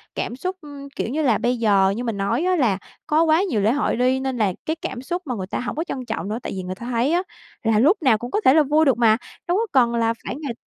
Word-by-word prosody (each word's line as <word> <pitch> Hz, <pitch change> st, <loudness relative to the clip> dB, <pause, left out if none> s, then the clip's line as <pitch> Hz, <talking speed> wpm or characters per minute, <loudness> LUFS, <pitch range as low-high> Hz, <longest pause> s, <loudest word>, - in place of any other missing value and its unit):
cảm 240 Hz, -, -3 dB
xúc, 370 Hz, +7 st, -4 dB
ừm, 285 Hz, -2 st, -10 dB
kiểu -, -, -2 dB
như 310 Hz, +4 st, -1 dB
là, 245 Hz, -7 st, +3 dB
bây 245 Hz, 0 st, 0 dB
giờ 200 Hz, -4 st, +3 dB
như 245 Hz, -, -4 dB
mình 230 Hz, -4 st, -3 dB
nói 200 Hz, -, 0 dB
á 370 Hz, 0 st, +2 dB
là 230 Hz, -, +2 dB, 0.3 s
có 310 Hz, +2 st, +3 dB
quá 320 Hz, +1 st, +4 dB
nhiều 230 Hz, -, 0 dB
lễ 215 Hz, +3 st, +3 dB
hội 285 Hz, -2 st, 0 dB
đi, 255 Hz, +2 st, +2 dB
nên 265 Hz, -2 st, -3 dB
là 205 Hz, -4 st, +1 dB
cái 315 Hz, -, -1 dB
cảm 255 Hz, -6 st, -6 dB
xúc 345 Hz, +8 st, -3 dB
mà 250 Hz, -4 st, -3 dB
người 185 Hz, -2 st, -5 dB
ta -, -, -3 dB
hổng 250 Hz, -, -4 dB
có 320 Hz, -, -1 dB
trân 260 Hz, -7 st, -5 dB
trọng 220 Hz, -3 st, -4 dB
nữa. 220 Hz, -, -2 dB
Tại -, -, -4 dB
vì 185 Hz, -, -4 dB
người 185 Hz, +1 st, -5 dB
ta 235 Hz, -, -9 dB
thấy 240 Hz, +5 st, +1 dB
á 355 Hz, +2 st, +2 dB, 0.4 s
là 225 Hz, -2 st, +3 dB
lúc 315 Hz, -, +4 dB
nào 255 Hz, -7 st, +4 dB
cũng 240 Hz, +4 st, -7 dB
có 420 Hz, -, 0 dB
thể 260 Hz, -, +7 dB
là 310 Hz, 0 st, +5 dB
vui 300 Hz, +3 st, +3 dB
được 265 Hz, -3 st, +3 dB
mà, 220 Hz, -2 st, +4 dB, 0.3 s
đâu 355 Hz, +3 st, +2 dB
có 455 Hz, -, 0 dB
cần 240 Hz, -3 st, +3 dB
là 230 Hz, 0 st, +1 dB
phải -, -, -4 dB
ngày 285 Hz, -5 st, -5 dB
250 Hz, 305 wpm, -22 LUFS, 225-305 Hz, 0.4 s, thể